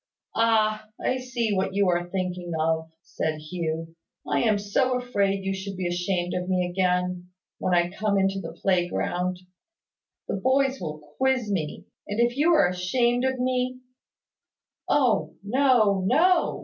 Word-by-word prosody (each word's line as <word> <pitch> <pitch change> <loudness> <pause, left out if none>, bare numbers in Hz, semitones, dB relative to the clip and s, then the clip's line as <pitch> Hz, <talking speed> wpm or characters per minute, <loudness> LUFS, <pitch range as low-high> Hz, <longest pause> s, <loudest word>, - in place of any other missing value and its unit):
"Ah! 215 -1 +2
I 260 - 0
see 240 -4 -1
what 190 0 -1
you 200 -1 +3
are 175 0 0
thinking 180 -2 -3
of," 160 0 0
said 160 0 -2
Hugh. 165 0 -4 0.3
"I - - +1
am 220 -3 +3
so 250 +6 +1
afraid 200 -6 0
you 195 - 0
should 190 0 -6
be 185 - -3
ashamed 175 0 -1
of 180 0 -3
me 180 -1 +1
again, 180 0 0 0.3
when 180 - +1
I 175 0 +2
come 200 +1 0
into 195 0 +1
the 165 -3 -7
playground. 180 0 0 0.9
The - - -2
boys 265 +4 +1
will 155 -3 -5 0.2
quiz 260 -5 +1
me; 155 -6 -3 0.2
and 205 +2 -3
if 240 0 +2
you 305 +5 +3
are 300 - +5
ashamed 235 +8 +1
of 260 -1 0
me 255 0 0 0.5
" - - -26
"Oh, 255 -6 +2
no, 220 -4 +3
no!" 335 - +3
195 Hz, 155 wpm, -25 LUFS, 180-245 Hz, 0.9 s, are